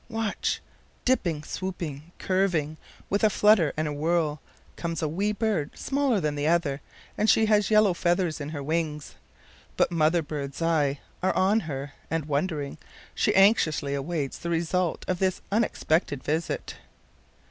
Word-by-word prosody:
Watch! 225 -2 -1 0.4
Dipping, 170 -12 +1
swooping, 170 -4 -5
curving, 180 -5 0 0.3
with 200 +2 0
a 215 - +6
flutter 205 -7 +4
and 155 0 0
a 150 - -2
whirl, 155 -1 0 0.3
comes 165 -1 -3
a - - +2
wee 195 +7 0
bird, 210 -8 -1
smaller 275 -5 +1
than 150 -4 -1
the 145 +1 -1
other, 155 -4 +1 0.4
and 215 - +3
she 220 - +5
has 210 -2 +3
yellow 215 -3 +5
feathers 175 -2 0
in 145 - -4
her 145 -3 -5
wings. 155 -1 -2 0.6
But - - +3
mother 165 0 +2
bird's 140 -2 -5
eyes 155 -4 +1 0.2
are 185 - +1
on 200 +4 +3
her, 140 +1 -5 0.2
and 165 -2 -1
wondering, 150 -1 -2 0.3
she - - +1
anxiously 165 -8 +4
awaits 140 0 -3
the 170 - -4
result 170 +1 0
of 180 -1 -1
this 190 -1 +1
unexpected 170 - 0
visit. 160 +2 -2
165 Hz, 150 wpm, -26 LUFS, 150-190 Hz, 0.6 s, a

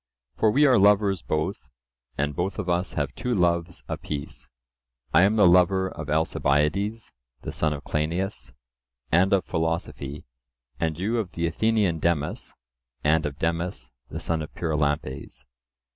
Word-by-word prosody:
For 110 - +3
we 145 +7 +4
are 130 -6 +5
lovers 100 -2 +4
both, 80 -2 -3 0.5
and 75 0 -1
both 90 +5 -2
of 100 -4 -3
us 90 +1 0
have 70 -2 -2
two 125 +8 -2
loves 85 -1 0
apiece:—I 65 -1 -4
am 100 +3 +4
the 105 -4 +6
lover 95 +2 +4
of 75 -2 -7
Alcibiades, 80 +7 0 0.3
the - - -4
son 80 - 0
of 70 -1 -5
Cleinias, 85 +6 -2 0.6
and 95 +4 +4
of 100 -2 +3
philosophy; 80 -3 -3 0.5
and 80 -1 -1
you 110 +6 0
of 100 -5 -4
the 85 - -1
Athenian 100 -1 +1
Demus, 80 -3 -1 0.5
and 80 +1 +3
of 70 -1 -7
Demus 85 -6 -2 0.2
the - - -5
son 80 -1 -1
of 75 - -7
Pyrilampes. 75 -5 -2
85 Hz, 145 wpm, -25 LUFS, 75-95 Hz, 0.6 s, the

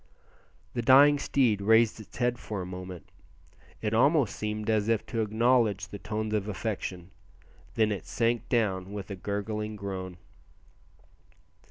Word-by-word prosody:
The 120 - -1
dying 140 +4 +6
steed 120 -8 +1
raised 110 +2 +4
its 110 - -12
head 120 0 0
for 105 -2 -5
a 90 - -4
moment, 90 -1 -8 0.8
it 105 0 -1
almost 135 0 +3
seemed 105 0 -4
as 110 -1 +1
if 115 -2 +1
to 115 - -2
acknowledge 110 -3 +2
the 100 - -8
tones 110 +1 -3
of 105 -1 -1
affection, 95 -3 -4 0.6
then 110 -1 +2
it 100 - -4
sank 115 0 0
down 100 -6 0
with 100 -1 -6
a - - -3
gurgling 105 +2 -4
groan. 95 -3 -6
105 Hz, 145 wpm, -28 LUFS, 100-115 Hz, 0.8 s, dying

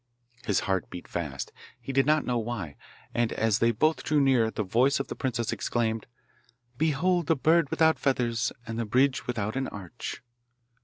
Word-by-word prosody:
His 100 - +2
heart 95 -1 -1
beat 90 - -8
fast 70 -7 -4 0.3
he 130 +3 -6
did 135 +1 +3
not 155 0 +3
know 120 -1 0
why 110 -10 -4 0.4
and 120 -1 +1
as 110 -1 +1
they 115 - +4
both 155 +8 +2
drew 150 -1 +2
near 130 -5 +4
the 110 - -3
voice 125 +9 +2
of 140 - -4
the - - -4
princess 120 -3 -2
exclaimed, 115 -2 -1 0.7
'Behold 160 +4 +1
the 165 - +4
bird 160 +2 +3
without 160 0 +3
feathers 120 -4 +1
and 115 0 -4
the 115 - -1
bridge 130 +5 +2
without 110 -2 -2
an 135 0 -1
arch! 100 +5 -7
120 Hz, 175 wpm, -28 LUFS, 110-140 Hz, 0.7 s, they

